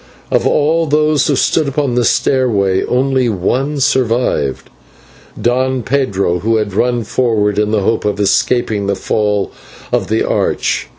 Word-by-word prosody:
Of - - +2
all 160 +2 +1
those 150 -1 +2
who 145 - +1
stood 155 +3 +1
upon 140 -2 -1
the 120 0 +1
stairway 105 -8 +1
only 130 -1 +1
one 130 +9 -1
survived, 125 - 0 0.7
Don 130 +1 0
Pedro, 100 -9 0
who 115 +4 0
had 105 -3 -1
run 120 +3 0
forward 105 -3 0
in 105 0 +1
the 105 -1 +1
hope 110 +3 0
of 105 -1 -1
escaping 105 0 +1
the 100 - 0
fall 105 -1 -1 0.4
of - - 0
the - - 0
arch. - - -1
120 Hz, 145 wpm, -15 LUFS, 105-135 Hz, 0.7 s, Of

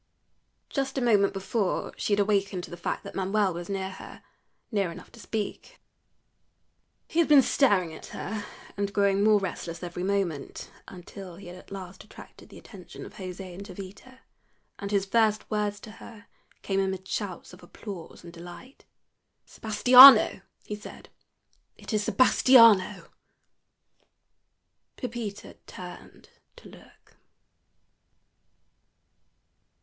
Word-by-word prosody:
Just 270 -1 -3
a - - +2
moment 210 -5 +3
before 195 +1 -2
she 210 - -2
had 205 - +2
awakened 200 -2 0
to - - -10
the - - -6
fact 175 - -4
that - - -9
Manuel 195 0 0
was 175 +2 -7
near 190 -1 -3
her - - -12 0.5
near 200 -5 0
enough - - -12
to 235 - -16
speak. 210 0 -6 1.3
He 335 - -2
had 335 - +4
been 290 -3 +7
staring 195 - +2
at - - -11
her, 210 +1 -6 0.3
and 200 0 -3
growing 200 0 +2
more 215 -1 +5
restless 170 -2 -6
every 175 0 -6
moment, 185 -7 -3 0.2
until 185 0 -11
he 200 - -13
had 175 0 -10
at 185 - -15
last 190 -1 -9
attracted 215 - -15
the - - -13
attention - - -12
of - - -12
José 185 -1 -8
and 190 +3 -9
Jovita, 200 +7 -12 0.6
and 200 - -5
his 200 -1 0
first 215 +1 +1
words 210 -1 -1
to 220 - -11
her 220 0 -14 0.4
came 195 -1 -1
amid 190 -1 -3
shouts 190 -4 -5
of 180 - -14
applause 180 0 -10
and 170 -1 -12
delight. 175 +10 -13 0.6
"Sebastiano," 250 +3 +7 0.2
he 210 - -5
said; 210 - -12 0.7
"it - - -8
is 210 -1 0
Sebastiano." 230 -3 +5 1.9
Pepita 230 -5 -7
turned - - -12 0.3
to - - -15
look. - - -19
200 Hz, 135 wpm, -27 LUFS, 185-215 Hz, 1.9 s, been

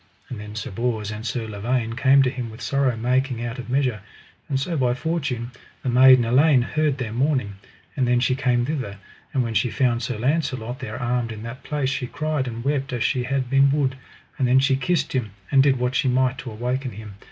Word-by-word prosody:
And 120 - -6
then 105 0 -8
Sir 110 - -5
Bors 110 -1 -2
and 105 +1 -6
Sir 115 -1 -3
Lavaine 115 +2 -2
came 135 +2 +5
to 130 - +1
him 125 -4 -5
with 110 +1 -11
sorrow 135 -4 0
making 125 +1 0
out 120 +2 -5
of 125 - -7
measure. 125 -5 0 0.5
And 135 -2 0
so 165 +5 -2
by 125 -4 +1
fortune 130 -6 -2 0.3
the 130 - -1
maiden 130 0 +7
Elaine 130 +2 +4
heard 150 +1 0
their 115 -4 -4
mourning, 130 -6 0 0.4
and 130 -3 +1
then 120 0 +3
she 130 +1 +2
came 125 -3 +1
thither; 130 -8 -3 0.3
and 130 - +1
when 115 -1 -3
she 120 - +2
found 120 -1 +1
Sir 120 -1 -3
Launcelot 130 -2 -1
there 120 -3 -6
armed 120 -1 -1
in 110 -1 -7
that 115 +3 -7
place 145 -3 -1
she 130 -1 -2
cried 155 -1 -2
and 115 -1 -5
wept 140 -1 0
as 120 - -1
she 125 -2 0
had 135 0 -1
been 135 +2 +4
wood; 135 -2 +1 0.4
and 130 - +2
then 125 +1 +4
she 135 0 +4
kissed 150 +3 0
him, 115 -7 -2 0.2
and 135 - +6
did 135 -1 +3
what 125 +1 -1
she 145 0 +1
might 130 0 +1
to 130 - -6
awake 125 +4 -2
him. 110 -5 -7
125 Hz, 220 wpm, -23 LUFS, 120-135 Hz, 0.5 s, maiden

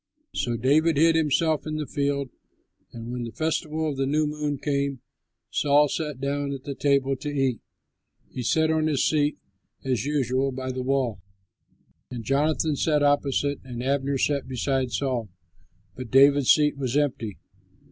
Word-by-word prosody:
So 120 -1 -1
David 145 +6 +3
hid 165 +2 +5
himself 160 0 +1
in 155 - -3
the 155 -1 -2
field; 140 -2 -2 0.6
and 115 0 -8
when 125 0 -4
the 115 - -6
festival 160 +1 -2
of 145 -3 -3
the 135 0 0
New 155 +2 +1
Moon 150 -1 -2
came, 140 -1 -1 0.5
Saul 145 0 +3
sat 150 -4 -3
down 140 +1 -2
at 135 -1 -7
the 140 - -4
table 140 -1 +1
to 145 - -5
eat. 135 -4 0 0.7
He 125 - -5
sat 160 +6 +2
on 155 -1 +1
his 145 -4 +1
seat, 150 -1 +1 0.5
as 125 -4 0
usual, 135 -2 0
by 130 0 -4
the 130 0 -4
wall, 125 -6 -1 0.9
and 120 -2 -6
Jonathan 150 +4 +1
sat 150 +1 +1
opposite, 145 0 +1
and 125 -2 -6
Abner 135 +1 0
sat 140 +1 0
beside 130 0 -1
Saul; 125 -6 -2 0.7
but 130 -2 -7
David's 140 +1 +5
seat 150 -2 +4
was 135 -1 -1
empty. 125 -8 -1
140 Hz, 160 wpm, -25 LUFS, 130-150 Hz, 0.9 s, hid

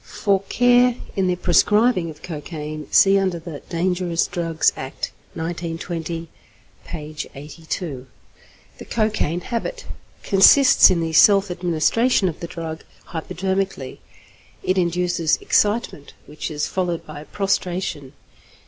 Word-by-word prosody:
For 195 -3 0
care 245 0 +4 0.2
in 190 -1 +1
the 180 - +1
prescribing 195 +1 +3
of 155 - -12
cocaine 155 -2 -6
see 195 0 +5
under 185 -3 -1
the 165 -3 -8
'Dangerous 175 -1 0
Drugs 165 -2 0
Act, 130 0 -5 0.2
1920' 165 0 -4 0.6
(p. 155 0 -7 0.2
82). 145 -1 -6 0.7
The - - -9
=Cocaine 215 -7 -1
Habit= 475 - -4 0.4
consists 225 +7 +7
in 175 -2 +1
the 165 -1 -3
self 195 +3 +5
administration 180 +6 +1
of 165 - -4
the 170 - -5
drug 165 -2 -7 0.2
hypodermically. 190 -3 -3 0.6
It 185 0 +1
induces 175 -2 +1
excitement, 205 -9 0
which 150 +3 -6
is 150 -1 -2
followed 175 -3 -2
by 155 0 -9
prostration. 180 -8 -2
175 Hz, 115 wpm, -21 LUFS, 160-195 Hz, 0.7 s, consists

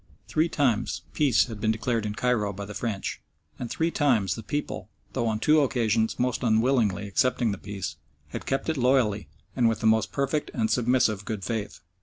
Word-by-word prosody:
Three 160 +2 +1
times 120 -8 0
"peace" 140 -7 +3
had 110 -4 -8
been 110 - +1
declared 110 0 0
in 105 - -4
Cairo 110 -4 +1
by 100 +1 -6
the 105 - -8
French, 105 -1 -3 0.4
and 120 - -4
three 165 +6 0
times 125 - +2
the 115 - -6
people 145 +7 -4 0.2
though 120 - 0
on 110 -1 0
two 155 +6 +4
occasions 115 -5 +1
most 125 0 0
unwillingly 110 -4 +2
accepting 120 +3 +1
the 100 - -5
peace 100 -5 -5 0.3
had - - -7
kept 135 - -1
it 160 -2 0
loyally 120 -7 +2 0.3
and 120 -2 +4
with 115 - -1
the - - -3
most 110 0 +3
perfect 140 +2 -1
and 110 -2 +1
submissive 120 -4 +2
good 105 -2 -4
faith. 105 +1 -4
115 Hz, 190 wpm, -26 LUFS, 105-130 Hz, 0.4 s, two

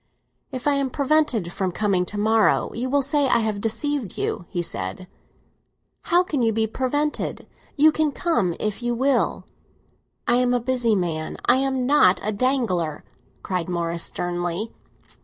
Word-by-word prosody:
"If 255 +1 -4
I 290 - +4
am 275 -1 0
prevented 270 - +1
from 190 -2 -1
coming 190 -2 0
to 205 - -4
morrow, 220 +1 +2
you 250 +2 -3
will 285 +1 +2
say 285 +1 +1
I 250 - +4
have 215 -3 -1
deceived 245 0 -2
you!" 175 - -2
he 175 - -2
said. 95 - -4 1.0
"How 350 +1 +4
can 300 -7 -2
you 225 -1 +3
be 220 0 +1
prevented? 280 +6 -2 0.3
You 310 +2 +6
can 310 -1 +1
come 270 - 0
if 215 +2 -2
you 240 0 -1
will." 270 +3 +1 0.8
"I 240 - +4
am 250 0 +2
a - - +2
busy 240 -2 +1
man—I 175 +6 0
am 265 -1 0
not 250 -9 +4
a 215 - 0
dangler!" 205 - 0 0.4
cried 180 -2 -2
Morris 170 -1 -2
sternly. 175 +5 -2
230 Hz, 155 wpm, -23 LUFS, 185-270 Hz, 1.0 s, You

